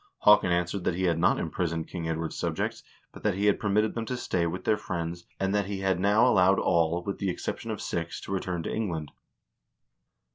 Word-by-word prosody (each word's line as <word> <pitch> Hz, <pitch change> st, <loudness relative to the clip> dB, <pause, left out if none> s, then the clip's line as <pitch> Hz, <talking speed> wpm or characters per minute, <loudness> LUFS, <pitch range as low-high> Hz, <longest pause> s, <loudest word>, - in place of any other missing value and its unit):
Haakon 105 Hz, -3 st, +6 dB
answered 90 Hz, +2 st, 0 dB
that 85 Hz, -, +1 dB
he 95 Hz, -, -2 dB
had 85 Hz, -3 st, +2 dB
not 85 Hz, -, +3 dB
imprisoned 80 Hz, 0 st, -2 dB
King 85 Hz, -2 st, -4 dB
Edward's 80 Hz, 0 st, -3 dB
subjects, -, -, -2 dB, 0.3 s
but -, -, -12 dB
that 105 Hz, -3 st, +1 dB
he 100 Hz, +2 st, 0 dB
had 105 Hz, -, +3 dB
permitted 105 Hz, +1 st, +1 dB
them 115 Hz, -1 st, -4 dB
to 125 Hz, -, -2 dB
stay 85 Hz, -7 st, 0 dB
with 90 Hz, +2 st, -4 dB
their 110 Hz, -, +3 dB
friends, 85 Hz, -3 st, -5 dB
and 95 Hz, 0 st, 0 dB
that 100 Hz, -2 st, +1 dB
he 100 Hz, -1 st, -4 dB
had 95 Hz, -2 st, +1 dB
now 105 Hz, +5 st, +4 dB
allowed 95 Hz, -4 st, +5 dB
all, 85 Hz, 0 st, +2 dB
with 100 Hz, -, -4 dB
the 100 Hz, -, 0 dB
excep 90 Hz, -, -3 dB
tion -, -, -8 dB
of -, -, -3 dB
six, 85 Hz, 0 st, -3 dB
to -, -, -8 dB
return 90 Hz, -3 st, -2 dB
to -, -, -3 dB
England. 85 Hz, -9 st, -3 dB
90 Hz, 220 wpm, -28 LUFS, 85-100 Hz, 0.3 s, Haakon